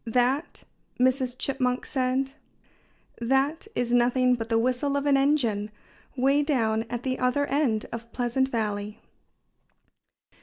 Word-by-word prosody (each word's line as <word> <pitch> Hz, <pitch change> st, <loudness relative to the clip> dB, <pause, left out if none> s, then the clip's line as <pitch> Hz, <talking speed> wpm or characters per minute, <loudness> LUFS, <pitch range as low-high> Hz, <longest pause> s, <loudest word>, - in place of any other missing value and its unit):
"That 250 Hz, +6 st, 0 dB, 0.2 s
" -, -, -40 dB
Mrs. 255 Hz, 0 st, +1 dB
Chipmunk 255 Hz, -2 st, -1 dB
said 260 Hz, 0 st, 0 dB, 0.9 s
"that 270 Hz, -, 0 dB
is 240 Hz, -1 st, -1 dB
nothing 250 Hz, +1 st, +3 dB
but 230 Hz, -2 st, -3 dB
the 225 Hz, -, +2 dB
whistle 255 Hz, +4 st, +1 dB
of 280 Hz, -, -2 dB
an 285 Hz, -1 st, +4 dB
engine, 260 Hz, -7 st, +1 dB, 0.5 s
way 275 Hz, +3 st, +3 dB
down 225 Hz, -7 st, 0 dB
at 240 Hz, 0 st, -4 dB
the 260 Hz, -1 st, -2 dB
other 255 Hz, +3 st, +1 dB
end 270 Hz, -7 st, 0 dB
of 230 Hz, 0 st, -7 dB
Pleasant 245 Hz, +2 st, 0 dB
Valley." 210 Hz, -3 st, -3 dB
250 Hz, 130 wpm, -26 LUFS, 235-270 Hz, 0.9 s, an